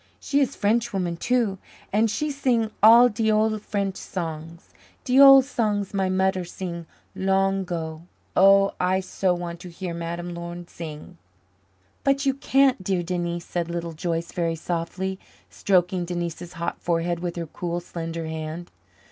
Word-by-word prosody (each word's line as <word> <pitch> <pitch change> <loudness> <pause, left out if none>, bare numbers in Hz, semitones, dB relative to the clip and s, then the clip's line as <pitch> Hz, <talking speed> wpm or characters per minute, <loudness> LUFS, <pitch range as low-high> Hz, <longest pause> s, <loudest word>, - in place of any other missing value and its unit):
She 285 - 0
is 275 - +1
Frenchwoman, 205 -5 0
too, 230 -2 0 0.3
and 220 +2 +3
she 300 +8 -1
sing 245 -6 0
all 230 +3 +9
de 220 -1 0
ole 215 0 +2
French 200 -2 -3
songs 165 -1 -6 0.3
de 255 +1 +3
ole 275 -1 +10
songs 210 -7 -1
my 190 -1 0
mudder 190 0 +1
sing 170 -1 -6 0.3
long 195 0 +1
'go. 165 -1 -5 0.3
Oh! 195 +1 +6
I 185 +1 +2
so 185 -1 0
want 170 -1 -6
to 180 - -9
hear 175 0 -6
Madame 170 +1 -5
Laurin 170 0 -7
sing." 165 +1 -9 0.8
"But 275 +1 +2
you 270 - +3
can't, 270 -4 +2
dear 185 -2 0
Denise," 175 -1 -3
said 170 -1 -3
Little 170 -1 -4
Joyce 165 0 -3
very 165 -2 -1
softly, 180 +3 -3 0.3
stroking 180 -2 +1
Denise's 175 0 -5
hot 170 0 -4
forehead 170 0 0
with 175 -1 -4
her 170 -1 -3
cool, 175 +2 -4
slender 165 -1 -5
hand. 160 +2 -6
180 Hz, 150 wpm, -24 LUFS, 170-205 Hz, 0.8 s, ole